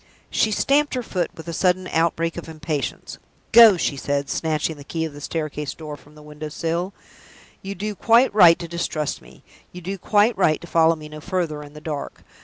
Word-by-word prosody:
She 220 - +2
stamped 280 +6 +2
her 250 - -2
foot 180 -6 -2
with 160 - -11
a 170 - -4
sudden 185 +2 +1
outbreak 165 0 0
of 170 -1 -7
impatience. 150 -3 -4 0.3
"Go!" 225 -4 +9
she 150 - -1
said, 140 0 -2
snatching 155 -1 -1
the 145 - -11
key 160 +3 -3
of 160 - -6
the 145 - -10
staircase 150 -2 -4
door 155 -2 -7
from 145 +1 -19
the 150 - -14
window 150 0 -8
sill. 170 +4 -2 0.7
"You 195 +1 -6
do 210 +3 -3
quite 230 +5 +4
right 175 -5 +7
to 170 - -7
distrust 165 -3 -3
me 60 +1 -18 0.3
you 180 - -9
do 190 +2 -5
quite 210 +5 +3
right 160 -5 +2
to - - -10
follow 165 -1 +3
me 155 -1 -10
no 155 0 -10
further 170 -4 -2
in 145 0 -12
the 150 - -11
dark. 150 -2 -6
165 Hz, 205 wpm, -22 LUFS, 150-185 Hz, 0.7 s, Go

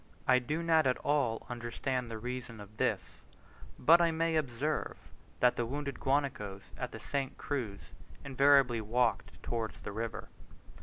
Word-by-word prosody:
I 130 -1 +6
do 150 +7 -2
not 160 -3 +4
at 125 - +2
all 140 -6 0
understand 120 +1 -3
the 115 - -5
reason 125 0 -6
of 105 +1 -12
this, - - -1 0.6
but 170 +6 +6
I 170 - +4
may 165 0 0
observe, 150 +1 -1 0.4
that 125 0 +5
the 120 - 0
wounded 140 +1 -4
guanacos 130 -9 -1
at - - -4
the - - -8
St. 140 -1 -3
Cruz 120 -9 -3 0.4
invariably 135 -3 +4
walked 120 +4 0
towards 115 -2 -3
the - - -6
river. 115 +2 -4
125 Hz, 150 wpm, -32 LUFS, 115-145 Hz, 0.6 s, I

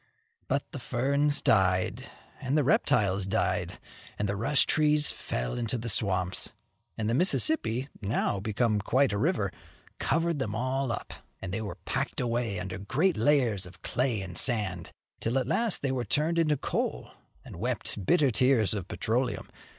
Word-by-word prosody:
But - - -1
the 145 - -6
ferns 140 +4 +1
died, 95 -3 +2 0.3
and 135 +4 0
the 150 - +3
reptiles 100 -6 +2
died, 90 -3 -1 0.4
and 105 - -1
the 100 - -1
rush 135 +8 +2
trees 150 -1 +3
fell - - -4
into 120 +1 -1
the 115 +1 -4
swamps, 95 -3 +1 0.4
and 110 -2 -2
the 115 - +1
Mississippi, 140 - +2
now 100 -1 0
become 110 +1 0
quite 130 +3 +2
a 100 - -1
river, 120 - +1 0.5
covered 165 -1 0
them 110 -5 -2
up, 130 0 -2 0.3
and 95 -1 -6
they 110 - -2
were 105 - -6
packed - - -2
away 115 -4 -1
under 95 +1 -5
great 155 - +1
layers 115 -6 +2
of 90 0 -16
clay 125 -5 -1
and 90 -2 -1
sand, 105 -9 +1 0.3
till 115 +3 0
at 130 - +1
last 230 -9 0
they 135 - +1
were 130 -2 -1
turned 155 +9 0
into 155 -3 +2
coal, - - -3 0.3
and - - -10
wept 100 - -3
bitter 140 - +3
tears 115 -3 +3
of 100 -4 -4
petroleum. 120 +3 -2
115 Hz, 160 wpm, -28 LUFS, 100-140 Hz, 0.5 s, the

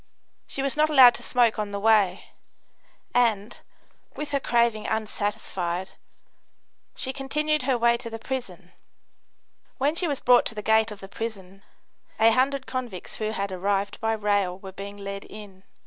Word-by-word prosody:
She 275 - -4
was 275 - -1
not 305 +1 +3
allowed 260 -5 +8
to - - -6
smoke 235 -3 +2
on 210 -1 -2
the 200 0 -4
way, 210 -3 +2 0.8
and, 230 -3 +1 0.6
with 295 -1 -5
her 280 - +1
craving 235 -4 +1
unsatisfied, 205 -4 -3 1.0
she 265 - -3
continued 300 +3 -1
her 255 -1 +1
way 235 0 +3
to 230 - -7
the 225 - -6
prison. 195 -8 -6 1.1
When 285 +3 +1
she 345 +1 0
was 285 -3 -1
brought 245 -1 +4
to 225 - -1
the 210 - -5
gate 220 +1 +3
of 210 -2 -10
the 195 - -8
prison, 195 -3 -7 0.6
a 225 +1 +6
hundred 265 +3 +1
convicts 245 -8 -5
who 215 -1 -2
had 200 -2 -3
arrived 195 +2 -1
by 225 0 +1
rail 205 -4 0
were 190 0 -10
being 200 +2 -8
led 200 0 -6
in. 200 -3 -12
220 Hz, 165 wpm, -25 LUFS, 200-255 Hz, 1.1 s, allowed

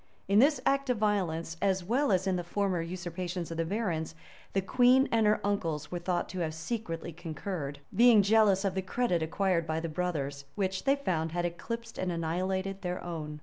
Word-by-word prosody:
In 200 +2 +5
this 285 +2 +5
act 275 -1 +2
of 250 - +2
violence, 175 -6 0
as 190 -2 +1
well 245 +7 +1
as 190 0 +2
in 190 -1 +1
the 175 - -2
former 185 0 0
usurpations 175 0 -4
of 165 - -4
the 165 - 0
barons, 165 -5 -2 0.4
the 195 - +2
queen 255 +6 +5
and 225 -2 +3
her 210 - +3
uncles 165 -7 -1
were 175 - -2
thought 175 0 -1
to 185 - -5
have 160 -2 -2
secretly 170 -2 -4
concurred; 160 -2 -5 0.2
being 230 -1 +7
jealous 205 -1 +4
of 195 - +1
the 190 - -1
credit 185 -2 0
acquired 170 +1 0
by 160 +1 -1
the 165 0 -4
brothers, 150 -5 -3
which, 190 -2 -1
they 275 0 +4
found, 165 - -2
had 175 0 0
eclipsed 230 +7 -5
and 185 -1 -1
annihilated 190 +4 -2
their 180 -1 -3
own. 155 -3 -5
185 Hz, 195 wpm, -30 LUFS, 165-205 Hz, 0.4 s, being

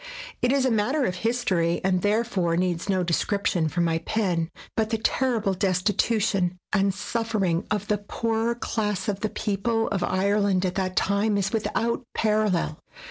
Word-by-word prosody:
It 245 - +2
is 275 -1 +2
a 260 - +2
matter 250 +7 +1
of 180 -4 -2
history, 185 -7 +1
and 185 -1 +2
therefore 205 -5 +1
needs 180 +1 -1
no 185 -2 +2
description 175 -1 0
from 170 +4 0
my 165 -1 +1
pen; 170 -3 -1 0.3
but 220 -1 +1
the 225 - 0
ter 245 +2 +1
rible 200 -2 0
destitution 195 0 +1 0.2
and 200 -1 +3
suffering 205 -3 -1
of 210 -1 -1
the 210 -1 +1
poorer 225 +2 -1
class 210 -5 -2
of 200 -2 -1
the 215 - -1
people 225 +3 -1
of 200 -3 -1
Ireland 195 0 +1
at 180 - -1
that 185 -1 -2
time 200 +1 +2
is 195 -1 -1
without 230 +2 0
parallel. 210 -7 +1
200 Hz, 165 wpm, -25 LUFS, 185-225 Hz, 0.3 s, and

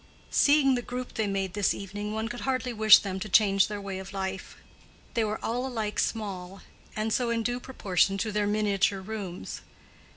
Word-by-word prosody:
Seeing 285 -2 +5
the 245 - 0
group 250 +1 -6
they 220 -2 -1
made 195 -2 -2
this 205 0 +1
evening, 205 +2 -5
one 220 +1 -2
could 240 +1 -6
hardly 255 -2 -1
wish 215 -1 +8
them 190 -2 -4
to 215 - -5
change 195 -1 +4
their 210 -1 -5
way 195 -1 -5
of 190 +1 -9
life. 190 -1 -5 0.6
They 230 - +1
were 215 0 -1
all 245 +3 -1
alike 220 -5 -3
small, 195 -4 -3 0.3
and 215 0 -1
so 245 -2 +1
in 230 -1 0
due 245 +2 -1
proportion 195 -6 0
to 215 +2 -2
their 205 0 0
miniature 205 -2 +1
rooms. 190 -3 -6
210 Hz, 190 wpm, -28 LUFS, 195-230 Hz, 0.6 s, wish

